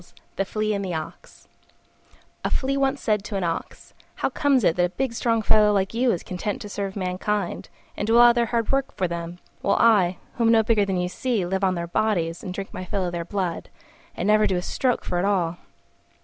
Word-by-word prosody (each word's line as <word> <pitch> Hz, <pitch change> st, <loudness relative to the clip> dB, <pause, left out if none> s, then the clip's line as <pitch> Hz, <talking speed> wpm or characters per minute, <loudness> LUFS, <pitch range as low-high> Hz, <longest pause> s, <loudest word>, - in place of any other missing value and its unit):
THE 195 Hz, -, 0 dB
FLEA 215 Hz, +2 st, -1 dB
AND 200 Hz, -1 st, -2 dB
THE 180 Hz, -3 st, -3 dB
OX 155 Hz, -1 st, -8 dB, 1.0 s
A -, -, 0 dB
Flea 275 Hz, +1 st, 0 dB
once 275 Hz, 0 st, +1 dB
said 210 Hz, -3 st, 0 dB
to 210 Hz, -, -5 dB
an 195 Hz, -, -1 dB
Ox, 165 Hz, -1 st, -4 dB, 0.2 s
"How -, -, -1 dB
comes 280 Hz, -5 st, +2 dB
it 165 Hz, -, +3 dB
that 180 Hz, -, +2 dB
a -, -, -2 dB
big 255 Hz, +6 st, -2 dB
strong 230 Hz, -1 st, 0 dB
fellow 210 Hz, 0 st, +5 dB
like 195 Hz, 0 st, 0 dB
you 245 Hz, +1 st, +2 dB
is 175 Hz, -, -2 dB
content 185 Hz, +3 st, -4 dB
to 205 Hz, -, -8 dB
serve 200 Hz, -1 st, -4 dB
mankind, 190 Hz, 0 st, -2 dB, 0.3 s
and 205 Hz, -, -3 dB
do 225 Hz, +1 st, +4 dB
all 240 Hz, 0 st, +8 dB
their 235 Hz, -1 st, +1 dB
hard 230 Hz, -1 st, 0 dB
work 275 Hz, 0 st, 0 dB
for 185 Hz, -, +1 dB
them, 170 Hz, 0 st, -5 dB, 0.2 s
while 200 Hz, -, +2 dB
I, 195 Hz, -6 st, +4 dB, 0.2 s
who 235 Hz, -, +2 dB
am 225 Hz, -, +5 dB
no 225 Hz, -1 st, +5 dB
bigger 215 Hz, -2 st, +2 dB
than 190 Hz, -2 st, -1 dB
you 180 Hz, 0 st, 0 dB
see, 220 Hz, 0 st, -1 dB
live 190 Hz, +2 st, -2 dB
on 185 Hz, -1 st, +2 dB
their 170 Hz, 0 st, -3 dB
bodies 170 Hz, -3 st, 0 dB
and 185 Hz, -, -6 dB
drink 195 Hz, +1 st, -6 dB
my 185 Hz, -, -5 dB
fill 185 Hz, +1 st, -2 dB
of 175 Hz, -, -2 dB
their 170 Hz, -1 st, -3 dB
blood, 185 Hz, -2 st, -3 dB, 0.5 s
and 175 Hz, -, -2 dB
never 215 Hz, +1 st, +4 dB
do 190 Hz, -, 0 dB
a 180 Hz, -, -3 dB
stroke 255 Hz, +5 st, -1 dB
for 175 Hz, -, -1 dB
it 180 Hz, -, 0 dB
all?" 175 Hz, -4 st, 0 dB
200 Hz, 235 wpm, -24 LUFS, 180-230 Hz, 1.0 s, all